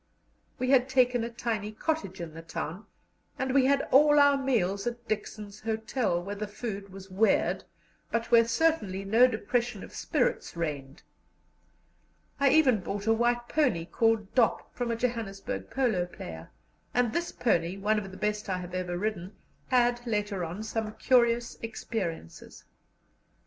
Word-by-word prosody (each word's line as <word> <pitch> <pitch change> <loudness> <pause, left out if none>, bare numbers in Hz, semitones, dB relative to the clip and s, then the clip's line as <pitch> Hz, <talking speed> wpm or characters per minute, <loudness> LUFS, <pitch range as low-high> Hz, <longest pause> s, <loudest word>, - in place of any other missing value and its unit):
We 255 0 0
had 260 -1 +4
taken 250 -2 +3
a 230 - -3
tiny 225 -3 -3
cottage 215 - -3
in 165 -2 -6
the 165 - -8
town, 165 +4 -6 0.5
and 265 0 -1
we 270 -1 +5
had 275 +1 +3
all 295 +2 +6
our 285 0 +6
meals 230 -7 0
at 240 0 -5
Dixon's 210 -1 -4
Hotel, 220 -3 -1
where 200 +2 -5
the 210 +1 -4
food 205 -2 -6
was 190 0 -11
weird, 210 +4 +2 0.5
but 230 0 -2
where 230 -1 +6
certainly 230 -9 +1
no 225 +5 +6
depression 240 +1 -2
of - - -11
spirits - - -1
reigned. 145 -2 -4 1.4
I 280 0 +5
even 265 -6 +5
bought 200 +2 -4
a 225 - +4
white 240 +1 +1
pony, 250 - +1
called 225 +1 +1
Dop, 240 -4 +1
from 245 -1 -3
a 230 - 0
Johannesburg 230 -1 -3
polo 220 -10 +1
player, 80 - -9 0.5
and 245 -2 +2
this 345 0 -1
pony, 175 -5 0
one 210 +2 +1
of 195 -2 -7
the 185 - -11
best 210 0 -2
I 185 - 0
have 180 0 -7
ever 180 -1 -2
ridden, 195 -1 -3 0.3
had 245 -1 +3
later 205 -4 -1
on 175 +6 -5
some 220 -1 -3
curious 235 -2 +2
experiences. 195 - -5
220 Hz, 155 wpm, -29 LUFS, 195-245 Hz, 1.4 s, all